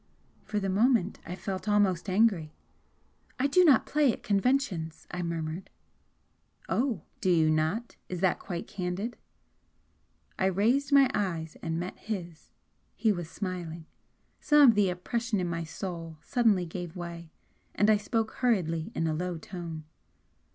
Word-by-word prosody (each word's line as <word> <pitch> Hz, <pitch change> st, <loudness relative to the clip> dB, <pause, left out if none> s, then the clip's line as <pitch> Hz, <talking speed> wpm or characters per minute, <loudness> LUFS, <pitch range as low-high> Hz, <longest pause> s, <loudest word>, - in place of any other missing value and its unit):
For 210 Hz, -1 st, -1 dB
the 195 Hz, -, -2 dB
moment 210 Hz, 0 st, +2 dB
I 180 Hz, -, -4 dB
felt 195 Hz, +2 st, -4 dB
almost 200 Hz, -3 st, +2 dB
angry. 185 Hz, -6 st, +2 dB, 0.8 s
"I 255 Hz, -, +1 dB
do 325 Hz, +6 st, +5 dB
not 285 Hz, -8 st, +6 dB
play 295 Hz, -3 st, +3 dB
at -, -, -8 dB
conventions," 200 Hz, -, 0 dB
I 180 Hz, -, -3 dB
murmured. 165 Hz, +1 st, -4 dB, 1.0 s
"Oh, 240 Hz, -, 0 dB, 0.2 s
do 185 Hz, -, 0 dB
you 160 Hz, -3 st, +4 dB
not? 160 Hz, +10 st, -1 dB
Is 180 Hz, -, -4 dB
that 190 Hz, -2 st, +2 dB
quite 175 Hz, -3 st, -5 dB
candid?" 195 Hz, +4 st, -4 dB, 1.2 s
I 190 Hz, -, +3 dB
raised 235 Hz, -, +2 dB
my 280 Hz, -1 st, +7 dB
eyes 165 Hz, -6 st, -2 dB
and 165 Hz, -1 st, -2 dB
met 180 Hz, +2 st, -5 dB
his, 175 Hz, -7 st, -6 dB, 0.5 s
he 220 Hz, -, +2 dB
was 175 Hz, -5 st, -3 dB
smiling. 170 Hz, -4 st, -5 dB, 0.5 s
Some 295 Hz, -3 st, +6 dB
of -, -, +6 dB
the 205 Hz, -3 st, +3 dB
oppression 220 Hz, +4 st, -2 dB
in 180 Hz, -, -1 dB
my 170 Hz, -1 st, -2 dB
soul 165 Hz, -1 st, -6 dB
suddenly 215 Hz, -7 st, +2 dB
gave 175 Hz, +1 st, -6 dB
way, 170 Hz, -2 st, -7 dB, 0.5 s
and 205 Hz, -, +3 dB
I 215 Hz, -1 st, +6 dB
spoke 220 Hz, +1 st, -1 dB
hurriedly 175 Hz, -10 st, +1 dB
in 165 Hz, -, 0 dB
a 160 Hz, -, 0 dB
low 175 Hz, +2 st, -2 dB
tone. 165 Hz, -2 st, -7 dB
185 Hz, 150 wpm, -29 LUFS, 170-220 Hz, 1.2 s, my